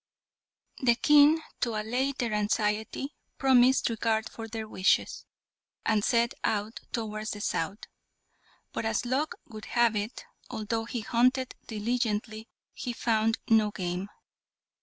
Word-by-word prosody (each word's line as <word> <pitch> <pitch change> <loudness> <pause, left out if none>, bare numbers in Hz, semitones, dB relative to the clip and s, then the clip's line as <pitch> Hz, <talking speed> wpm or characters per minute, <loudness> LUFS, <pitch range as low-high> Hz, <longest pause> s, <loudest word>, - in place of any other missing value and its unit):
The 240 -2 +4
King, 295 +4 +6 0.2
to 235 -2 -1
allay 250 +6 0
their 240 -4 -2
anxiety, 210 +6 -1 0.2
promised 260 -1 +5
regard 220 -1 0
for 225 -1 -7
their 220 0 -5
wishes, 190 -2 +1 0.6
and 215 -2 +2
set 235 0 +2
out 210 +1 -1
towards 215 -1 -3
the 205 - -4
south; 195 +1 -2 0.9
but - - -2
as 225 +2 0
luck 270 +5 0
would 215 -3 -10
have 235 -2 +2
it, 210 +4 -4 0.2
although 225 -1 -2
he 235 0 -4
hunted 255 +3 +2
diligently, 220 0 -2 0.2
he 245 - -4
found 225 -1 +1
no 220 -2 +4
game. 185 0 -4
225 Hz, 125 wpm, -29 LUFS, 215-245 Hz, 0.9 s, King